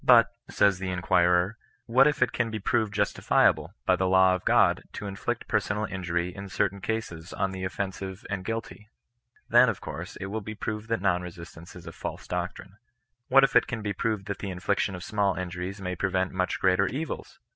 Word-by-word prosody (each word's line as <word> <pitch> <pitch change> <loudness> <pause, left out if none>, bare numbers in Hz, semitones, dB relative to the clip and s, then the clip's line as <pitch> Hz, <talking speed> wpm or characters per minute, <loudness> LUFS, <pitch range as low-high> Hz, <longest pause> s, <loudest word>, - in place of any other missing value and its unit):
But, 115 -5 +6 0.2
says 100 -2 +3
the 95 -1 -3
in 90 -1 -3
quirer 90 +4 +3
— - - -35
" - - -43
what 130 +5 +5
if 150 -3 +3
it 130 - 0
can 115 -2 0
be 110 - -3
proved 110 +1 0
justifiable, 100 0 +2
by - - +4
the 95 - 0
law 95 0 +5
of 95 - -2
God, - - +4
to - - -6
inflict 100 -1 -3
personal 105 +1 0
injury 90 -2 -2
in 100 0 -7
certain 100 +1 -1
cases 95 -7 -4
on 95 0 -1
the 95 -1 -6
offensive 95 0 -4
and 100 -1 -3
guilty 115 0 -5 0.3
?" 120 0 -37
Then, - - +7
of - - -3
course, - - -7
it - - -6
will 110 +1 -2
be 110 +1 -7
proved 110 +1 -5
that 115 -5 0
non 90 -2 +2
resistance 85 -1 -10
is 90 -2 -11
a - - -7
false - - -7
doctrine. - - -4
'^ - - -22 0.5
What 135 +1 +6
if 135 - +2
it - - +5
can 115 -2 -4
be 105 -1 -1
proved 105 0 -2
that 100 -1 -4
the 100 - -4
infliction 95 +1 -1
of 90 - -7
small 100 -2 +1
injuries 90 +2 -5
may 90 -1 -3
pre 95 +2 -1
vent 95 0 0
much 95 -1 -1
greater 95 +1 +3
evils?" 150 - -5
95 Hz, 220 wpm, -27 LUFS, 90-105 Hz, 0.5 s, Then